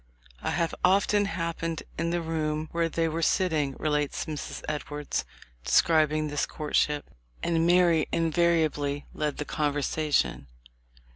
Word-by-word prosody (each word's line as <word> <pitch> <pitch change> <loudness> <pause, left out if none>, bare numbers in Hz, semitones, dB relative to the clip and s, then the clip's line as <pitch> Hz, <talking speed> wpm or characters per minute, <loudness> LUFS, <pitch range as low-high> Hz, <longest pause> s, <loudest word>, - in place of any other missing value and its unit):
"I - - -2
have 170 0 0
often 200 +2 +4
happened 165 -3 -3
in 170 +1 -1
the 170 0 -1
room 155 -1 -2
where 170 0 0
they 165 +1 0
were 165 +1 -2
sitting," 155 -6 +1
relates 150 -2 -1
Mrs. 155 -3 -6
Edwards, 150 -1 -3 0.4
describing 155 - +3
this 145 -1 -1
courtship, 150 -1 0 0.4
"and 165 -1 +2
Mary 175 -3 +4
invariably 160 -4 +1
led 150 -2 -2
the 150 - -3
conversation. 145 - 0
155 Hz, 125 wpm, -27 LUFS, 150-170 Hz, 0.4 s, often